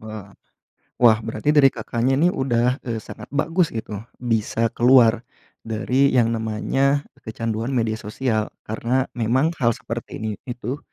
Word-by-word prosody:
Wah 110 Hz, -2 st, -9 dB, 0.7 s
wah, 115 Hz, -3 st, +6 dB
berarti 115 Hz, +5 st, -1 dB
dari 140 Hz, -2 st, +7 dB
Kakaknya, 120 Hz, +3 st, -1 dB
nih, 175 Hz, +3 st, +3 dB
udah, 125 Hz, 0 st, +1 dB
eee, 115 Hz, -2 st, -2 dB
sangat -, -, -10 dB
bagus 165 Hz, +4 st, +1 dB
gitu, 110 Hz, -2 st, -5 dB, 0.2 s
bisa 115 Hz, -1 st, 0 dB
keluar 120 Hz, -2 st, +5 dB, 0.4 s
dari 125 Hz, +5 st, +1 dB
yang 115 Hz, -2 st, +3 dB
namanya 135 Hz, +6 st, 0 dB, 0.2 s
kecanduan 115 Hz, +2 st, -3 dB
media 115 Hz, -2 st, +1 dB
sosial. 110 Hz, 0 st, -1 dB, 0.2 s
Karena 120 Hz, +4 st, 0 dB
memang 130 Hz, +7 st, +1 dB
hal 115 Hz, -1 st, +4 dB
seperti 115 Hz, +1 st, -6 dB
ini 110 Hz, 0 st, -3 dB, 0.2 s
itu 125 Hz, +2 st, -4 dB
115 Hz, 135 wpm, -22 LUFS, 110-130 Hz, 0.7 s, dari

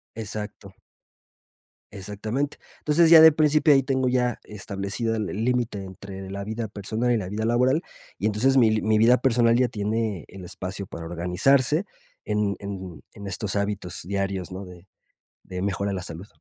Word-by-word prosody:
Exacto. 105 Hz, -2 st, -7 dB, 1.2 s
Exactamente. 105 Hz, +8 st, -4 dB, 0.2 s
Entonces, 160 Hz, +2 st, +3 dB
ya 165 Hz, -1 st, +10 dB
de 160 Hz, 0 st, +10 dB
principio 150 Hz, 0 st, +4 dB
ahí 135 Hz, -1 st, +4 dB
tengo 130 Hz, 0 st, 0 dB
ya 125 Hz, -1 st, 0 dB
establecido 100 Hz, +2 st, -4 dB
el 110 Hz, -3 st, -2 dB
el 110 Hz, +3 st, -3 dB
límite 120 Hz, -5 st, -1 dB
entre 95 Hz, 0 st, -9 dB
la 100 Hz, +1 st, -5 dB
vida 110 Hz, +2 st, -4 dB
personal 110 Hz, +4 st, -2 dB
y 120 Hz, -, +3 dB
la 95 Hz, -4 st, -4 dB
vida 105 Hz, +2 st, -2 dB
laboral, 125 Hz, +6 st, +2 dB, 0.4 s
y 100 Hz, -, -3 dB
entonces 115 Hz, +6 st, +3 dB
mi 110 Hz, -3 st, +4 dB
mi 110 Hz, 0 st, +2 dB
vida 115 Hz, +3 st, +5 dB
personal 120 Hz, -2 st, +3 dB
ya 125 Hz, +1 st, +3 dB
tiene 110 Hz, -4 st, -2 dB
el 95 Hz, -1 st, -11 dB
espacio 95 Hz, +3 st, -6 dB
para 85 Hz, -2 st, -8 dB
organizarse 120 Hz, -, +2 dB, 0.4 s
en 105 Hz, -1 st, 0 dB
en 95 Hz, -5 st, -7 dB
en 100 Hz, -, -9 dB
estos 95 Hz, +1 st, -3 dB
hábitos 100 Hz, -3 st, -2 dB
diarios, 95 Hz, 0 st, -3 dB
¿no? 95 Hz, +2 st, -6 dB
De 90 Hz, 0 st, -14 dB, 0.6 s
de 90 Hz, -1 st, -5 dB
mejora 100 Hz, +1 st, -1 dB
la 95 Hz, -2 st, -3 dB
salud. 85 Hz, +2 st, -7 dB
105 Hz, 165 wpm, -25 LUFS, 95-120 Hz, 1.2 s, ya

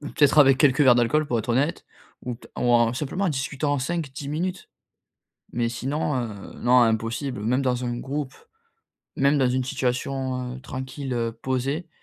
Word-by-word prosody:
peut-être 145 Hz, 0 st, +2 dB
avec 135 Hz, -2 st, +7 dB
quelques 140 Hz, -2 st, +4 dB
verres 130 Hz, -3 st, +7 dB
d'alcool, 125 Hz, +6 st, +2 dB
pour 120 Hz, -4 st, 0 dB
être 110 Hz, -, -5 dB
honnête 135 Hz, +7 st, 0 dB, 0.4 s
ou 125 Hz, -1 st, -3 dB
pe 115 Hz, -, -18 dB
t -, -, -26 dB
ou 120 Hz, -, +2 dB
en 120 Hz, 0 st, +4 dB
simplement, 150 Hz, +9 st, -2 dB
en -, -, +2 dB
discutant 145 Hz, +1 st, -1 dB
en -, -, 0 dB
5-10 140 Hz, -1 st, -4 dB
minutes 180 Hz, +4 st, -3 dB, 0.8 s
mais 120 Hz, -1 st, 0 dB
sinon, 140 Hz, +6 st, -2 dB
heu, 110 Hz, -5 st, -5 dB
non 125 Hz, +1 st, +5 dB
impossible! 115 Hz, +3 st, 0 dB
Même 125 Hz, +5 st, +1 dB
dans 125 Hz, -1 st, 0 dB
un 120 Hz, 0 st, -2 dB
groupe, 140 Hz, +2 st, -4 dB, 0.8 s
même 140 Hz, +2 st, +3 dB
dans 130 Hz, -2 st, +3 dB
une 130 Hz, +1 st, 0 dB
situation, 130 Hz, 0 st, -2 dB
heu, -, -, -10 dB
tranquille 130 Hz, +1 st, -5 dB
heu 115 Hz, -1 st, -1 dB
posée, 130 Hz, +7 st, -2 dB
130 Hz, 180 wpm, -24 LUFS, 120-145 Hz, 0.8 s, avec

